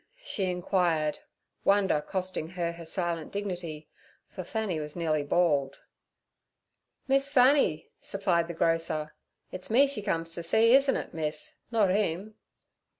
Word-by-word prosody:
she 195 Hz, -, -2 dB
inquired, 175 Hz, -4 st, 0 dB, 0.4 s
wonder 195 Hz, -6 st, +3 dB
costing 185 Hz, -1 st, -3 dB
her 175 Hz, -2 st, -2 dB
her 170 Hz, 0 st, -10 dB
silent 170 Hz, -2 st, -2 dB
dignity, 175 Hz, -6 st, -5 dB, 0.4 s
for 185 Hz, -, -6 dB
Fanny 200 Hz, -3 st, -2 dB
was 150 Hz, -1 st, -6 dB
nearly 160 Hz, -3 st, 0 dB
bald. 145 Hz, -3 st, +1 dB, 1.3 s
'Miss 275 Hz, +1 st, +2 dB
Fanny' 255 Hz, -, +3 dB
supplied 180 Hz, -4 st, 0 dB
the 170 Hz, -, -6 dB
grocer. 165 Hz, -2 st, 0 dB, 0.4 s
'It's 185 Hz, 0 st, -5 dB
me 255 Hz, +6 st, +6 dB
she 275 Hz, -6 st, -4 dB
comes 165 Hz, -5 st, -2 dB
to 170 Hz, -, -5 dB
see, 225 Hz, +8 st, +4 dB
isn't 275 Hz, 0 st, +5 dB
it, -, -, -6 dB
miss—not 165 Hz, +7 st, -1 dB
him?' 200 Hz, +1 st, -1 dB
175 Hz, 130 wpm, -28 LUFS, 160-205 Hz, 1.3 s, me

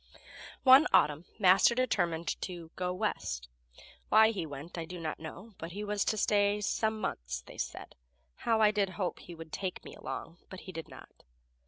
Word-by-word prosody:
One 265 Hz, +3 st, +8 dB
autumn 150 Hz, +3 st, +3 dB
Master 195 Hz, +3 st, +6 dB
determined 175 Hz, -10 st, 0 dB
to 175 Hz, -3 st, -6 dB
"go 180 Hz, -1 st, -1 dB
West." 75 Hz, -, -2 dB, 0.6 s
Why 220 Hz, +1 st, +7 dB
he 190 Hz, -7 st, -4 dB
went 145 Hz, +3 st, -8 dB
I 170 Hz, -, -3 dB
do 180 Hz, +2 st, -8 dB
not 160 Hz, -2 st, -4 dB
know, 190 Hz, +7 st, -9 dB
but 165 Hz, +1 st, -6 dB
he 205 Hz, +2 st, -4 dB
was 210 Hz, -1 st, 0 dB
to 215 Hz, -, 0 dB
stay 205 Hz, 0 st, +2 dB
"some 220 Hz, +2 st, 0 dB
months," -, -, -4 dB
they -, -, -12 dB
said. -, -, -5 dB, 0.4 s
How 225 Hz, -1 st, +1 dB
I 210 Hz, -1 st, +6 dB
did 205 Hz, -2 st, +1 dB
hope 185 Hz, -4 st, -2 dB
he 175 Hz, -, -10 dB
would 160 Hz, -1 st, -10 dB
take 185 Hz, -2 st, -4 dB
me -, -, -9 dB
along, 165 Hz, -, -7 dB
but 190 Hz, -, -9 dB
he 185 Hz, -, -9 dB
did 165 Hz, -2 st, -7 dB
not. -, -, -14 dB
185 Hz, 185 wpm, -31 LUFS, 165-210 Hz, 0.6 s, One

